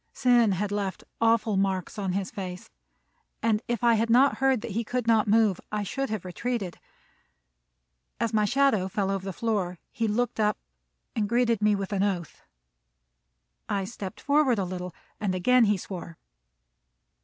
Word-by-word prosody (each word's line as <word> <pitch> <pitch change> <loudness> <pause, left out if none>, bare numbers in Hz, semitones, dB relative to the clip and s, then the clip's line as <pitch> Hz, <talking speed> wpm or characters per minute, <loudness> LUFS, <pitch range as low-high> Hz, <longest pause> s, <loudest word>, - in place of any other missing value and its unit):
Sin 240 -5 +4
had 200 +2 -2
left 200 -2 -3 0.2
awful 225 -2 +3
marks 190 0 -1
on 190 -3 -1
his 195 0 -2
face, 180 -2 -7 0.7
and 220 -2 +2
if 240 0 -2
I 235 -1 +5
had 225 +1 +1
not 260 +4 +5
heard 265 -3 +3
that 235 - -6
he 230 +4 -1
could 245 +1 -2
not 225 -2 +3
move, 210 -3 +3
I 210 -1 -1
should 270 +7 -3
have 215 -4 -4
retreated. 195 0 -3 1.4
As 230 -1 -1
my 215 -1 +3
shadow 235 -4 +2
fell 195 0 -1
over 195 -1 -2
the 195 - -4
floor, 190 -3 -2
he 230 - -1
looked 235 +2 -1
up 210 -1 +2 0.6
and 210 -2 0
greeted 235 -2 +2
me 210 0 +4
with 195 0 -4
an 195 - 0
oath. 185 -5 -2 1.3
I 200 -1 0
stepped 190 -2 -7
forward 285 -4 +3
a 195 - 0
little, 180 0 -5 0.3
and 195 -3 -1
again 245 +7 +4
he 210 -1 +2
swore. 175 -3 -8
210 Hz, 165 wpm, -27 LUFS, 195-230 Hz, 1.4 s, I